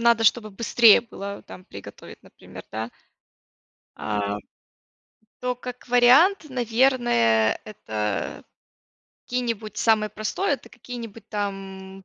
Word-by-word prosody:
надо, 235 -1 +4
чтобы 215 +1 +3
быстрее 230 +2 +5
было 200 -4 -8
там 185 - -12
приготовить, 100 - -12
например, - - -13
да. 110 +2 -5 1.0
А, 105 -1 -2 1.0
то 250 0 -1
как 250 0 -9
вариант, 260 +10 +5
наверное, 235 - +2
это 110 - -4 0.8
какие-нибудь, 230 -4 -3
самое 215 -2 +2
простое, 215 - -1
это - - -12
какие-нибудь 230 -3 -9
там, 195 -2 -5
215 Hz, 100 wpm, -24 LUFS, 190-245 Hz, 1.0 s, быстрее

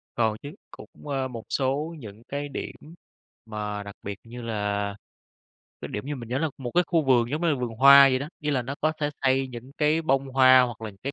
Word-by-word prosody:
Còn 110 -2 +1
chứ. 145 - -7 0.2
Cũng, - - -12 0.2
ờ, 135 -2 -1
một 115 -3 -8
số 145 +5 -1
những 110 -2 -11
cái 145 +1 -4
điểm 135 - -6 0.7
mà 105 -1 -4
đặc 100 0 -10
biệt 100 -1 -6
như 120 +1 -9
là 105 -2 -2 0.9
cái - - -6
điểm 105 - -5
như 145 -1 -3
mình 115 -2 -9
nhớ 130 +2 -1
là 160 - 0
một 125 -2 -5
cái 180 0 +4
khu 165 -3 +2
vườn 120 -2 +3
giống 155 +4 -2
như 170 - +2
là 150 - +3
vườn 125 -3 -3
hoa 140 +2 +8
vậy 130 -1 +1
đó. 145 +3 -5
Ý 150 0 -1
là 130 -3 0
nó 135 +3 -5
có 155 +1 +2
thể 145 0 0
xây 135 0 +2
những 125 +2 -10
cái 155 +2 +2
bông 135 -2 +1
hoa 130 -1 +6
hoặc 120 -3 -3
là 110 -1 -5
những 100 - -20
cái 140 +2 -3
130 Hz, 245 wpm, -26 LUFS, 115-140 Hz, 0.9 s, hoa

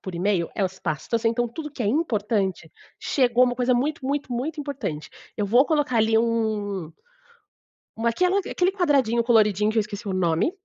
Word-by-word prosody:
por 185 -2 -7
e-mail 180 -1 0
é 205 - -1
as 190 0 -2
pastas, 175 +9 -3
então 240 +1 +1
tudo 300 +6 -7
que 255 - -5
é - - -1
importante 210 - -1 0.3
chegou 250 -2 +2
uma 245 -1 0
coisa 250 0 +1
muito 270 +1 -1
muito 280 -2 -2
muito 290 +6 -3
importante, 275 - -5 0.3
eu 210 - 0
vou 240 +7 +4
colocar 295 -6 +1
ali 220 0 +3
um 215 -6 -1 1.1
Uma 235 +1 +1
aquela 365 +10 +2
aquele 365 -1 0
quadradinho 275 - +2
coloridinho 215 -3 +3
que 225 - -3
eu - - +6
esqueci 205 -1 -7
o 190 - -2
nome, 175 - +1
230 Hz, 180 wpm, -24 LUFS, 205-270 Hz, 1.1 s, eu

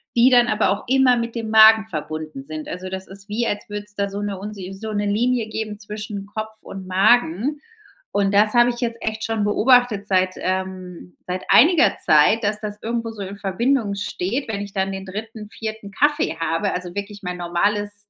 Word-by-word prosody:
die 240 +2 +6
dann 245 -2 +5
aber 215 -2 +1
auch 200 +2 -2
immer 260 -1 +4
mit 235 0 -3
dem 225 -2 -4
Magen 220 0 +7
verbunden 155 -5 -6
sind. 155 +2 -7
Also, 185 +1 -6
das 190 0 -6
ist 195 +1 -9
wie, 225 +3 -1
als 205 - -3
würde 205 0 -5
es 210 - -10
da 200 0 -1
so 200 +1 -5
'ne 205 -2 -4
unsi 195 -2 -7
so 215 +3 -6
'ne 205 0 -1
Linie 230 +2 +1
geben 215 -1 -5
zwischen 210 -1 -7
Kopf 215 +1 -7
und 190 -1 -9
Magen. 215 - +2 0.5
Und 200 0 +1
das 210 +1 +4
habe 240 0 +5
ich 240 - -8
jetzt 230 -1 -2
echt 220 0 -3
schon 225 -2 -1
beobachtet 225 -1 +3
seit 185 -1 +2
ähm, 185 -1 -4
seit 180 +1 -3
einiger 325 +5 +6
Zeit, 155 +10 +4
dass 210 0 0
das 210 -1 -5
irgendwo 230 0 -2
so 215 -2 -9
in 195 +1 -7
Verbindung 210 +3 0
steht. 200 +6 -3
Wenn 210 -2 -2
ich 200 -1 -7
dann 195 -1 -1
den 195 0 -6
3., 215 +2 -7
4. 220 -2 -7
Kaffee 290 - +1
habe, 165 +5 -1
also 180 -1 -5
wirklich 205 0 -6
mein 180 0 -4
normales 205 +4 -1
205 Hz, 200 wpm, -21 LUFS, 190-225 Hz, 0.5 s, Magen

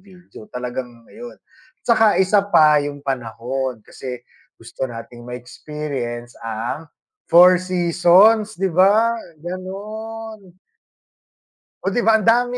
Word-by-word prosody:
video 180 - -16
talagang 125 -1 -6
ayon. 240 +2 -10 0.5
'Tsaka 225 -3 +4
1 195 +2 +3
pa 155 -6 +5
yung 145 -1 -6
panahon 125 -1 -4
kasi 125 -2 -8 0.3
gusto 115 +3 -6
nating 120 0 -10
ma-experience 125 -1 -6
ang 115 +8 -4 0.4
4 - - -27
four 180 +2 +9
seasons 185 +4 +3
'di 190 0 -1
ba? 210 +6 +4 0.3
Gano'n. 205 +2 -8 1.3
Oh, 195 - 0
'di 240 - +1
ba 220 -1 +4
ang 215 - -4
dami, 245 +2 +3
175 Hz, 115 wpm, -20 LUFS, -, 1.3 s, four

